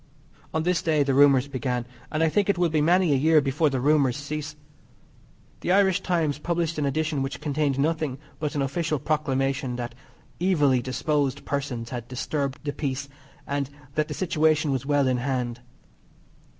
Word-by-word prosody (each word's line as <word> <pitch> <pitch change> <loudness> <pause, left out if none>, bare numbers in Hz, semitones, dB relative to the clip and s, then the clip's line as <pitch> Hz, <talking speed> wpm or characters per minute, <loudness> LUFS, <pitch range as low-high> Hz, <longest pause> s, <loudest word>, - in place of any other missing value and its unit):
On 160 - -1
this 180 0 +1
day 155 -3 +2
the 135 -1 0
rumours 140 -1 +5
began, 125 -3 -2 0.3
and 155 +1 +1
I 160 - +4
think 200 +4 +1
it 200 - +2
will 175 -1 +2
be 155 -1 +1
many 175 0 +4
a - - +3
year 155 +3 +5
before 145 +2 +1
the 135 -2 -1
rumours 140 -1 +3
cease. 150 +1 -5 1.0
The - - -1
Irish 190 -1 +4
Times 160 -5 0
published 170 -1 -1
an 145 - +1
edition 155 0 -1
which 135 +1 -3
contained 145 -2 0
nothing 155 -2 0 0.2
but 150 -1 -3
an 140 - +1
official 155 +3 -1
Proclamation 135 -3 -1
that 120 -1 -5 0.5
evily 145 -8 +3
disposed 135 +2 -1
persons 135 -5 -3
had 120 -2 -5
disturbed 135 +3 -3
the 145 -1 -3
peace, 140 -1 -3 0.4
and 140 -1 -2 0.2
that 155 +1 0
the - - -5
situation 155 -4 +2
was 135 0 -2
well 145 -2 +3
in 130 -1 +2
hand. 125 -2 -2
145 Hz, 175 wpm, -25 LUFS, 135-155 Hz, 1.0 s, rumours